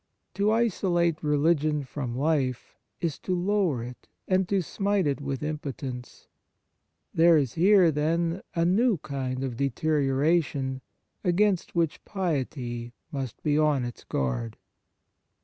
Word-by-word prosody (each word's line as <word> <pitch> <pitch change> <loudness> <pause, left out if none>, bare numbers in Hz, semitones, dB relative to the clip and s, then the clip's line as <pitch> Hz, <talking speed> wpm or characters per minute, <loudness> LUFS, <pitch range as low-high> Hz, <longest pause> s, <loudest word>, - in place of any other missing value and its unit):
To 200 +1 +1
isolate 175 -7 +1
religion 150 0 +2
from 130 -3 -5
life 135 -4 0 0.3
is 165 -5 -2
to 185 - -1
lower 180 - +1
it 125 +1 -10 0.2
and 185 -1 +2
to 195 -2 +1
smite 200 +2 0
it 145 0 0
with 135 0 -3
impotence; 140 -4 -6 0.9
there 165 0 +6
is 135 -5 0
here, 185 0 +5
then, 165 +4 0
a 165 0 +2
new 210 +4 +3
kind 130 -3 -4
of 125 -3 -4
deterioration, 140 0 +1 0.4
against 190 0 +1
which 165 -2 0
piety 130 - -3 0.2
must 135 -6 -5
be 150 -1 +2
on 150 -5 +2
its 120 - -8
guard. 65 - -2
150 Hz, 125 wpm, -27 LUFS, 135-175 Hz, 0.9 s, there